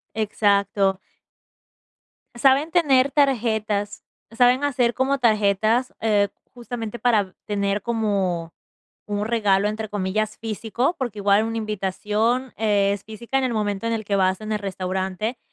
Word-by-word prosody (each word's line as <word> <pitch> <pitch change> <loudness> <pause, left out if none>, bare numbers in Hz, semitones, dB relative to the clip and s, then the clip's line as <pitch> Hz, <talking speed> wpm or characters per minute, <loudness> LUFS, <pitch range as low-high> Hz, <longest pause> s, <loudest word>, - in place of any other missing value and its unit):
Exacto. 200 -2 +1 1.4
Saben 275 +6 +3
tener 280 -6 +3
tarjetas. 220 -7 0 0.3
Saben 245 +4 +3
hacer 245 -4 +1
como 270 +2 +1
tarjetas, 220 +2 +2
eh, 205 -2 +3 0.3
justamente 240 -2 -6
para 210 -6 +1
tener 200 -1 -1
como 195 -7 -1 0.5
un 205 0 -2
regalo, 210 -3 +2
entre 215 0 -4
comillas, 210 +2 -2
físico, 225 - -2
porque 240 -6 -4
igual 200 +2 +3
una 225 0 -3
invitación 215 +4 -1
es 200 -2 +1
física 235 +5 -3
en 265 - 0
el 240 -3 -1
momento 205 0 -2
en 230 - 0
el 220 -1 -4
que 200 -1 0
vas 190 +1 +1
en 215 0 -4
el 210 - 0
restaurante. 190 +3 -3
215 Hz, 130 wpm, -23 LUFS, 200-240 Hz, 1.4 s, Saben